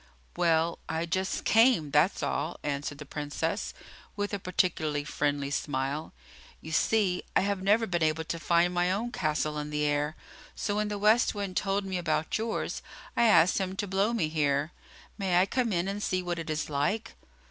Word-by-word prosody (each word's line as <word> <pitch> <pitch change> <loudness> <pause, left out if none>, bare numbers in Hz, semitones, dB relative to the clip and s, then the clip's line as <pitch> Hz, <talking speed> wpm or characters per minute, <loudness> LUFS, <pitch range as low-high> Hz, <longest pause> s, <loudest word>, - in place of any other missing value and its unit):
"Well, 170 -1 +2
I 160 +1 -1
just 185 +3 -2
came, 225 - +4
that's 150 +6 +3
all," 165 - -2
answered 145 0 -3
the 150 - -9
Princess, 150 +3 -3 0.4
with 205 0 -3
a 200 - -1
particularly 160 -5 0
friendly 145 -1 -1
smile. 140 +1 -2 0.5
"You 160 - -9
see, 190 +2 +2
I - - +5
have 200 0 -1
never 210 +4 +3
been 175 -4 -1
able 155 0 +1
to 170 +1 -4
find 170 +1 +2
my 175 +1 +2
own 225 +5 -1
castle 155 -5 -1
in 150 0 -4
the 150 0 -1
air, 150 +1 0 0.4
so 205 0 -2
when 210 0 +1
the 210 0 -3
West 215 +3 +3
Wind 200 -2 -4
told 195 0 0
me 190 -2 -2
about 165 -2 -1
yours 225 0 -2 0.3
I 235 - +4
asked 180 -4 +5
him 190 -1 -2
to 205 - -2
blow 195 +3 +1
me 225 -10 0
here. 150 -1 0 0.5
May 185 -3 +3
I 185 - +5
come 245 +2 0
in 175 0 0
and 200 +1 -3
see 185 -2 0
what 175 -1 -2
it 165 - -6
is 155 0 -1
like?" 150 +10 -1
175 Hz, 190 wpm, -29 LUFS, 150-200 Hz, 0.5 s, I